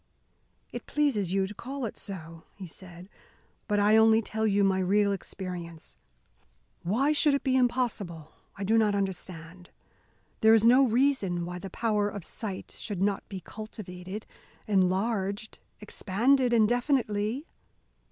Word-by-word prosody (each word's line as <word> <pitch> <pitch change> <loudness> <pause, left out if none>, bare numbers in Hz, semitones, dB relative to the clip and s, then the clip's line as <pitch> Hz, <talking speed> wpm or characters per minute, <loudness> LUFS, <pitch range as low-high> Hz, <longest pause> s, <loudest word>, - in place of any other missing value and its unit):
"It - - -7
pleases 250 - +1
you 195 0 +2
to 200 - -7
call 265 +4 -5
it 215 - -5
so," 165 -4 -8
he 195 - -8
said, 175 +1 -11 0.6
"but 205 -1 +1
I 210 +2 +5
only 220 0 +6
tell 220 0 -2
you 200 -1 +2
my 190 -1 +2
real 200 +2 +2
experience. 180 -4 -6 0.9
Why 240 - +1
it 305 - +1
should 280 -2 +3
be 260 -1 +1
impossible 235 -11 0 0.3
I 200 - -4
do 220 +3 +3
not 210 -2 +2
understand. 180 -2 -5 0.7
There 220 0 +6
is 220 - +3
no 255 +3 +6
reason 225 -8 +1
why 180 +1 -6
the 195 - -7
power 210 0 0
of 200 -4 -7
sight 200 -4 -7
should 205 -5 -5
not 200 -1 -1
be 190 -2 -6
cultivated, 200 -1 -8 0.4
enlarged, 200 +2 0 0.2
expanded 240 +6 +1
indefinitely." 240 +1 +1
205 Hz, 140 wpm, -28 LUFS, 185-230 Hz, 0.9 s, only